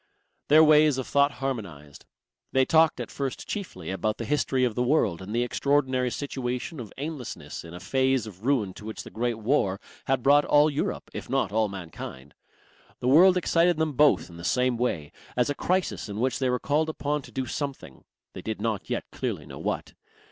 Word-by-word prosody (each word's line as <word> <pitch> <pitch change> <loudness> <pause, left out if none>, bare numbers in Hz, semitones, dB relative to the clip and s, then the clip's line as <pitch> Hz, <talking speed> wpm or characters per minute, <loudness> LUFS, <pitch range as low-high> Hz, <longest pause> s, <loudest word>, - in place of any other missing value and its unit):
Their 155 +2 +7
ways 150 -2 +5
of 130 - -2
thought 140 0 +3
harmonized. 100 - -6 0.5
They 130 0 +4
talked 160 +1 +4
at - - -5
first 135 -2 -4
chiefly 95 - -5
about 105 +3 -1
the 115 - -4
history 135 -1 +1
of 120 -3 +1
the 125 - -1
world 120 - +2
and 95 +2 -8
the 120 +2 +1
extraordinary 130 -1 +1
situation 130 +2 -4
of 110 -5 -7
aimlessness 130 - -6
in 85 0 -10
a - - -7
phase 130 +2 +1
of 100 -2 -11
ruin 120 -8 +1
to 105 - -12
which 110 - -6
the - - -11
Great 120 +1 -1
War 110 -4 +1 0.3
had 130 -2 0
brought 145 +1 +6
all 150 +1 +4
Europe, 145 - -3
if - - -7
not - - 0
all 110 0 +1
mankind. 80 -7 -8 0.7
The 125 - 0
world 180 +6 +7
excited 175 -1 +3
them 160 -1 0
both 150 +3 +4
in 85 - -13
the 85 - -9
same 125 +6 +2
way; 90 -12 -2 0.3
as 125 +3 +2
a - - 0
crisis 180 - -1
in 100 +1 -5
which 130 +2 0
they 130 -2 +1
were 125 - +1
called 150 +4 0
upon 150 -1 -2
to - - -14
do 130 -1 -2
something 135 - -5 0.3
they - - -7
did 110 -1 -4
not 110 -4 -2
yet - - -1
clearly - - -3
know - - -10
what. - - -3
130 Hz, 200 wpm, -26 LUFS, 110-145 Hz, 0.7 s, Their